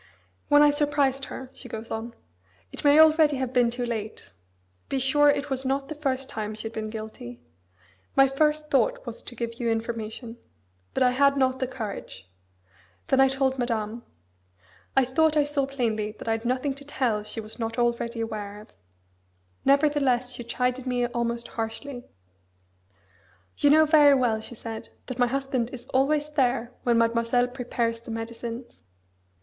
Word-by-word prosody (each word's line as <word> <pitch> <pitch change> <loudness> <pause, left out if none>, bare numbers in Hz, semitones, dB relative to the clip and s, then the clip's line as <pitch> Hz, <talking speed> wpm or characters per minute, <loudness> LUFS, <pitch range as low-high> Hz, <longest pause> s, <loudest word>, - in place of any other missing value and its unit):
"When 290 0 +7
I 295 - +6
surprised 285 -2 +1
her," 260 0 -8
she 250 - -10
goes 225 +1 -7
on: 230 +1 -5 0.6
"It - - -7
may 290 0 +6
already 310 -2 +6
have 260 -1 -3
been 245 -2 +4
too 245 +1 -3
late 220 - -5 0.6
be 275 - 0
sure 290 +3 +4
it 285 0 0
was 265 0 -1
not 270 +1 -1
the - - -3
first 270 -3 -2
time 215 0 -4
she 215 - -8
had 225 0 -5
been 215 -1 -4
guilty 215 - -8 0.8
my 270 0 +7
first 300 +2 0
thought - - +2
was - - -6
to 245 - -8
give 230 0 -5
you 235 -2 0
information. 225 +1 -4 0.6
But - - +3
I 250 - +4
had 280 +2 +3
not 260 -1 +2
the 260 - -1
courage. 220 - -7 0.8
Then 270 - +5
I 270 - +7
told 265 0 0
Madame. 230 -2 -2 1.0
I 265 - +6
thought 310 +4 +2
I 295 - +5
saw 285 -2 0
plainly 220 -6 -1
that 215 - -11
I - - +2
had 225 +1 -2
nothing 255 +3 0
to 280 +1 -12
tell 255 -7 -1
she 215 +2 -6
was 220 +2 -9
not 225 0 -3
already 235 -1 0
aware 210 -2 -5
of. 215 - -14 1.0
Nevertheless 275 -3 +3
she 245 -1 -6
chided 250 +2 -1
me 245 -1 +1
almost 235 0 -2
harshly. 245 +3 -5 1.5
'You 290 - +3
know 315 +2 +7
very 295 -2 +6
well,' 235 -4 +1
she 240 - -8
said, 225 0 -7 0.2
'that 255 -1 -7
my 245 - +4
husband 265 -2 -1
is 245 -2 -9
always 295 +3 +1
there 250 -4 +1
when 240 -1 +2
Mademoiselle 230 +2 +2
prepares 240 -2 -2
the 235 - -13
medicines. 230 +1 -6
250 Hz, 170 wpm, -26 LUFS, 230-275 Hz, 1.5 s, When